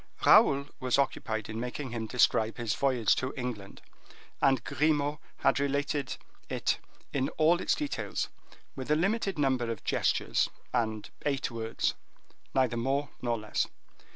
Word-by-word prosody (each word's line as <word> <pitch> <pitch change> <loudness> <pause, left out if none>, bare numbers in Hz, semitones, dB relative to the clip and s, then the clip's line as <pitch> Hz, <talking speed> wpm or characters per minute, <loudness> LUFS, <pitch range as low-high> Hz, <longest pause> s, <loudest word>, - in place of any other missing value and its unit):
Raoul 140 0 +7
was 130 -1 +1
occupied 110 -6 -1
in 110 +1 -5
making 125 +2 -4
him 115 -2 -3
describe 110 -2 +3
the 120 - -5
voyage 120 0 +2
to 130 +1 -2
England, 115 -6 -5 0.6
and 135 -1 +4
Grimaud 150 -1 +1 0.2
had 135 - +3
related 140 0 -1 0.3
it - - 0 0.3
in 135 -1 +1
all 165 +3 +4
its - - +2
details, 295 -2 -2 0.5
with 130 0 -6
a 150 - +5
limited 195 +2 0
number 130 -5 +1
of 115 -3 -4
gestures - - +1 0.2
and 110 -3 0 0.2
eight 140 -3 0
words, 115 -1 -1 0.6
neither 130 -3 +2
more 135 +4 0
nor 120 -1 0
less. 105 -1 -1
130 Hz, 140 wpm, -30 LUFS, 115-145 Hz, 0.6 s, Raoul